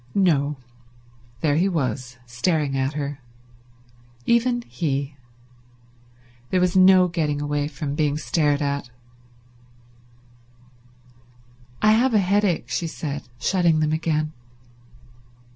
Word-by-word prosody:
No; 150 -7 +2 0.8
there 150 -2 +2
he 185 +4 +2
was, 130 - -3
staring 140 +3 -1
at 135 +2 -1
her. 145 -1 -4 1.1
Even 240 +1 +2
he. 140 -8 -3 1.3
There 185 - +2
was 180 0 +1
no 185 -1 +6
getting 155 -4 -1
away 145 0 -1
from 140 -1 -5
being 150 -1 0
stared 150 -2 +1
at. 140 -3 -2 2.9
"I 215 - +6
have 235 +2 +3
a - - +6
headache," 195 -2 +1
she 170 - -2
said, 145 -4 -5
shutting 170 +1 +2
them 155 0 +1
again. 155 -1 -1
155 Hz, 105 wpm, -23 LUFS, 145-180 Hz, 2.9 s, no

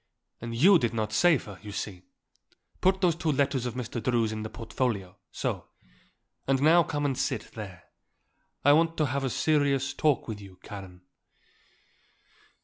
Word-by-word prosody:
And 115 0 -5
you 175 +9 +6
did 120 -3 -1
not 110 -1 -2
save 165 +2 +4
her, 100 -3 -10
you 105 -1 -8
see. 100 -2 -5 0.8
Put 190 +1 +3
those 175 -3 +4
two 165 -2 0
letters 135 -3 +1
of 120 - -5
Mr. 120 -1 -4
Drew's 115 -1 +1
in 110 0 -4
the 110 - -5
portfolio; 110 -5 -3 0.2
so. - - -3 0.8
And 135 -1 +3
now 160 +5 +6
come 145 -2 -2
and 135 -2 +1
sit, - - -2
there. 95 -6 -9 0.8
I 145 - +8
want 165 +2 +3
to 155 - +2
have 140 0 -2
a 135 - 0
serious 140 -1 +1
talk 150 -4 +1
with 105 -3 -5
you, 95 -2 -13
Karen." 95 -3 -9
125 Hz, 165 wpm, -28 LUFS, 110-150 Hz, 0.8 s, I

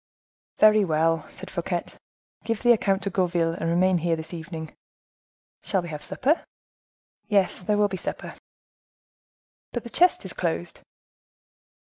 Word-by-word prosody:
"Very 215 -1 +6
well," 165 -2 +1
said 190 - -10
Fouquet, 175 -1 -2 0.6
"give 230 -2 -2
the 240 - +6
account 195 -4 +2
to 200 - -2
Gourville, 175 -3 +1
and 165 -1 -2
remain 180 +1 +3
here 170 0 +1
this 160 +1 -8
evening." 160 -1 -7 0.9
"Shall 190 -3 0
we 175 - -7
have 150 -1 -6
supper?" 285 - 0 0.8
"Yes, 200 -4 +2
there 205 +3 +1
will 205 0 +4
be 190 -2 -4
supper." - - -5 1.4
"But 240 - -3
the 235 - -9
chest 360 +1 +3
is - - -6
closed." - - -3
185 Hz, 140 wpm, -25 LUFS, 165-210 Hz, 1.4 s, Very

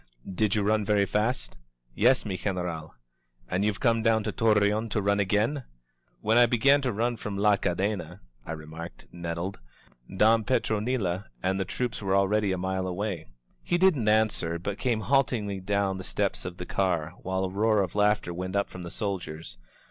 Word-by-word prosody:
Did 100 +2 0
you 105 - +1
run 105 +1 +2
very 100 -1 +2
fast?" 105 - -1 0.4
"Yes, 125 - +3
mi 100 -3 -2
General. 90 -5 -4 0.5
"And 90 +2 0
you've 105 -1 0
come 115 -3 +2
down 110 -1 +3
to 105 - -2
Torreon 105 0 +2
to 110 - 0
run 100 0 +1
again?" 105 +8 +1 0.6
"When 110 +3 +4
I 120 - +7
began 135 +5 +4
to 130 -2 0
run 115 +3 -1
from 105 -2 -5
La 105 0 +4
Cadena," 90 -2 -2 0.2
I 80 - -5
remarked, 80 -3 -9
nettled, 85 +2 -4 0.6
"Don 110 +2 +5
Petronilo 110 -5 0 0.2
and 95 +1 +1
the 95 - 0
troops 120 +4 -3
were 95 -1 +1
already 100 +1 +2
a 95 - 0
mile 95 +1 -2
away." 90 - -3 0.3
He 175 - 0
didn't 165 - +3
answer, 105 -6 +2
but 100 +4 -5
came 120 -4 0
haltingly 110 -4 +1
down 100 0 0
the - - -6
steps 100 +1 -2
of 90 0 -6
the 90 - -6
car, 90 -4 0
while 95 +1 -2
a 95 - -1
roar 105 +1 +2
of 90 - -5
laughter 105 -3 +2
went 95 +2 -4
up 100 - 0
from 90 - -8
the 85 - -6
soldiers. 80 - -5
100 Hz, 180 wpm, -27 LUFS, 95-110 Hz, 0.6 s, I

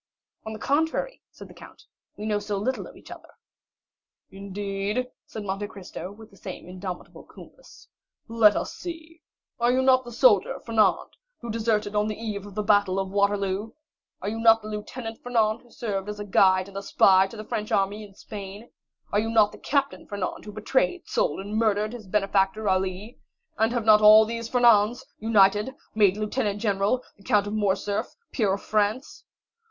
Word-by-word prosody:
"On 220 - -4
the - - -6
contrary," 320 - -1
said - - -13
the - - -15
count, - - -15 0.3
"we 210 - -6
know 210 -1 0
so 205 0 -3
little 255 +7 -2
of - - -14
each - - -15
other." - - -11 1.0
"Indeed?" 200 +4 -4 0.2
said 215 - -7
Monte 200 +1 -3
Cristo, 190 -3 -9
with 220 +2 -14
the 195 - -19
same 185 -2 -9
indomitable 185 0 -8
coolness; - - -16 0.4
"let 225 -3 +5
us - - -3
see. 330 -1 -9 0.4
Are 240 +1 +3
you 260 +1 +2
not 260 -1 +4
the 240 - -10
soldier 230 -5 +3
Fernand 220 -4 +1 0.2
who 235 -2 -5
deserted 215 -2 -1
on 210 0 +2
the 215 - -4
eve 205 -3 -5
of 200 - -12
the 210 - -1
battle 205 -2 +3
of 190 -1 -2
Waterloo? 200 +1 0 0.5
Are 200 - -1
you 225 +1 -4
not 225 -1 +5
the 215 - -7
Lieutenant 225 +2 -6
Fernand 230 -2 +1
who 240 - -23
served 205 -4 -4
as 210 0 -6
guide 185 0 +4
and 200 0 -7
spy 190 -1 +4
to 205 - -12
the 215 - -6
French 210 0 -4
army 200 +2 0
in 200 -2 -14
Spain? 205 +2 -9 0.4
Are 205 - +3
you 225 +1 -1
not 215 -2 +4
the - - -13
Captain 280 0 -1
Fernand 200 -2 -4
who 210 - -7
betrayed, 260 - -1
sold, - - 0
and 205 +2 -7
murdered 215 0 +1
his 225 -5 -9
benefactor, 195 +1 +1
Ali? 190 +4 -2 0.4
And 220 +1 +3
have 240 -3 -2
not 215 -1 +7
all 215 +1 +8
these 230 +1 -5
Fernands, 235 -2 +4
united, 210 +2 +3 0.2
made 205 -2 +3
Lieutenant 210 -1 -2
General, 205 +4 0
the 200 - -20
Count 210 -4 +2
of 205 - -5
Morcerf, 205 -1 -1 0.2
peer 210 -6 +1
of 195 - -2
France?" 215 +6 -1
210 Hz, 180 wpm, -25 LUFS, 200-230 Hz, 1.0 s, all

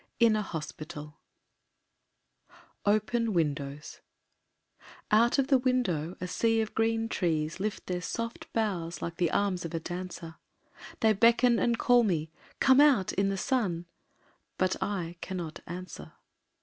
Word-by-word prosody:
In 230 -2 +5
a 215 - +1
Hospital 155 -4 -7 1.3
IV - - -24 0.3
Open 215 +2 +1
Windows 150 -3 -2 1.1
Out 230 +5 +4
of 275 0 +1
the 270 -3 +5
window 210 - 0
a 180 - -4
sea 225 +4 +1
of 220 0 -2
green 225 0 +1
trees 160 -5 -1
Lift 210 +2 -3
their 180 -1 -3
soft 230 +5 -5
boughs 180 -7 -2
like 170 0 -5
the 175 -2 +2
arms 190 -2 0
of 165 0 -5
a - - 0
dancer, 175 -1 -7 0.6
They 220 -1 +5
beckon 235 +3 +4
and 235 -1 +1
call 245 0 +5
me, 165 -8 0 0.3
"Come 265 +1 +6
out 270 -11 +4
in 195 0 +1
the 195 - -2
sun!" 190 -8 -1 0.7
But 185 0 +1
I 175 -4 -3
cannot 175 -4 -5
answer. 180 0 -8
190 Hz, 140 wpm, -29 LUFS, 170-230 Hz, 1.3 s, Come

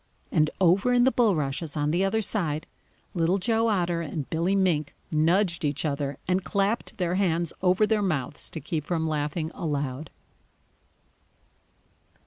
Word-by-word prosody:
And 155 -3 +3
over 195 +7 +4
in 245 0 +5
the 260 - +4
bulrushes 160 - 0
on 150 0 +1
the 175 +4 +2
other 220 +3 +1
side, 160 -8 -1 0.5
Little 170 +2 +2
Joe 225 +3 +1
Otter 175 -5 +1
and 150 -3 -4
Billy 170 +4 +1
Mink 170 -7 +1 0.2
nudged 170 +3 +2
each 145 +1 -1
other 140 -1 -2
and 185 +1 +1
clapped 205 +4 -1
their 180 -2 0
hands 170 -3 0
over 185 +3 +4
their 215 -1 +1
mouths 150 -7 -2
to - - -5
keep 155 +1 -3
from 160 0 -1
laughing 155 +1 -2
aloud. 145 -2 -3
170 Hz, 145 wpm, -26 LUFS, 155-195 Hz, 0.5 s, in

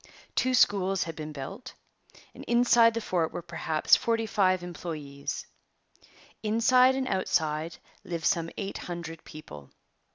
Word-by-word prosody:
Two 255 0 +2
schools 195 -4 +3
had 165 -1 -7
been 155 -1 -6
built. 195 - -8 0.6
Inside 235 -1 +4
the 230 - -1
fort 170 -6 0
were 175 - -6
perhaps 160 -2 +2
forty 230 -1 0
five 185 -3 +2
employees. 155 -5 -6 1.0
Inside 250 +4 +4
and 265 -1 -2
outside 160 -4 -1 0.3
lived 170 -2 -5
some 165 -3 +1
eight 200 -1 -4
hundred 165 -2 -7
people. 75 - -11
180 Hz, 125 wpm, -28 LUFS, 160-225 Hz, 1.0 s, Inside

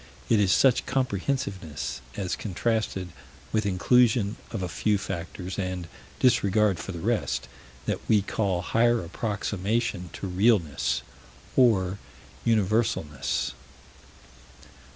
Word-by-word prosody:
It 110 - +5
is 100 -3 +3
such 130 +3 +4
comprehensiveness, 100 - -2 0.2
as 95 -3 -1
contrasted 105 -2 -1 0.4
with 110 -2 +1
inclusion 110 +2 +3
of 110 -5 -4
a - - -1
few 100 +6 +1
factors 90 0 -5
and 90 -2 -3 0.3
disregard 105 -5 +3
for - - -5
the 85 - -6
rest, 80 - -1 0.4
that - - -1
we 105 -3 +5
call 95 -3 -1
higher 120 +1 +3
approximation 105 0 -2
to - - -6
realness 90 - +2 0.5
or 100 -6 +3 0.4
universalness. 110 -9 +1
100 Hz, 105 wpm, -27 LUFS, 90-115 Hz, 0.5 s, It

